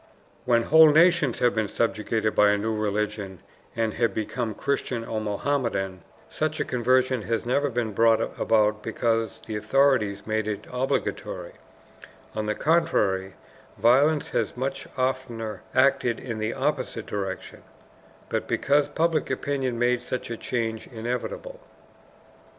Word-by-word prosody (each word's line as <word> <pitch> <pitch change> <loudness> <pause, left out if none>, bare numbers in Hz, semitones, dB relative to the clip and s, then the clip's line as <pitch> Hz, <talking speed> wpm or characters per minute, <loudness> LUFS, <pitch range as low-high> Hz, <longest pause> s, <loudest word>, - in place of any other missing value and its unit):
When 120 -2 +3
whole 160 +4 +7
nations 165 -4 +4
have 125 - +2
been 110 -2 0
subjugated 110 0 -1
by 105 0 +5
a 105 - +3
new 110 +2 -1
religion, 105 -2 -2 0.4
and 115 -2 0
have 115 -4 0
become 110 0 -3
Christian 130 -4 -2
or 110 -1 -3
Mohammedan, 105 -4 -1 0.3
such 155 0 -2
a - - 0
conversion 130 0 +2
has 115 +2 -2
never 140 +4 +1
been 115 -3 -2
brought 115 +1 +4 0.2
about 105 -1 +2
because 115 0 -1
the 110 - -5
authorities 110 -2 +2
made 110 -1 -1
it 105 -2 -4
obligatory 125 +1 -2 0.8
(on 110 0 -3
the 105 - 0
contrary, 95 - +1 0.4
violence 140 +6 +3
has - - -1
much 135 +1 -3
oftener 130 -4 -2
acted 130 -3 +3
in 115 -4 -5
the 110 +1 -2
opposite - - -2
direction), 95 -2 -5 0.7
but - - -2
because 145 +1 +2
public 160 +1 0
opinion 130 -2 -2
made 120 +1 +2
such 125 -2 -5
a - - -2
change 115 -3 -3
inevitable. 125 - -5
115 Hz, 135 wpm, -25 LUFS, 110-130 Hz, 0.8 s, whole